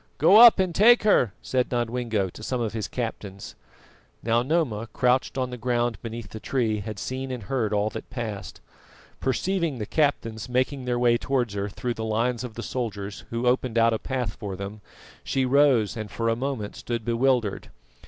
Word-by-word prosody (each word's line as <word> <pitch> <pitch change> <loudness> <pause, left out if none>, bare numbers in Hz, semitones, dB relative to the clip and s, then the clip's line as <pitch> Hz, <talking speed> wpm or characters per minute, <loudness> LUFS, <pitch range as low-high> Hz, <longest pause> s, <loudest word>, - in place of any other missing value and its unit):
"Go 200 - +6
up 235 0 +10
and 185 -3 0
take 235 +7 +6
her," 165 - +4
said 125 -1 0
Nodwengo 120 -4 -1
to - - -12
some 125 +3 -2
of 115 -2 -2
his 110 -2 -3
captains. 105 -5 -5 0.7
Now 115 +1 +2
Noma, 125 -6 0
crouched 125 +1 +1
on 130 -1 -1
the 125 - -5
ground 120 -2 0
beneath 115 -1 -7
the 110 - -8
tree, 110 -4 0
had 105 +1 -6
seen 130 +5 -4
and 125 -4 -5
heard 115 0 -1
all 105 +1 +1
that - - -8
passed. 110 -7 -6 0.6
Perceiving 165 +3 -1
the 105 - -4
captains 115 -6 -1
making 130 +1 0
their 125 -1 0
way 120 -1 +3
towards 125 -6 -1
her 100 0 -2
through 120 +4 -3
the 110 - -5
lines 115 +2 0
of 120 -3 -7
the 115 - -5
soldiers, 105 -5 -4
who 115 +1 -2
opened 125 -1 +1
out 115 0 +4
a 110 - -1
path 125 -7 -3
for 100 -3 -6
them, 100 +2 -7 0.4
she 135 -1 0
rose 130 -5 +3
and 110 -2 -5
for 115 +3 -1
a 115 - +2
moment 125 -4 -4
stood 115 -2 -4
bewildered. 120 -3 +1
120 Hz, 190 wpm, -25 LUFS, 110-130 Hz, 0.7 s, up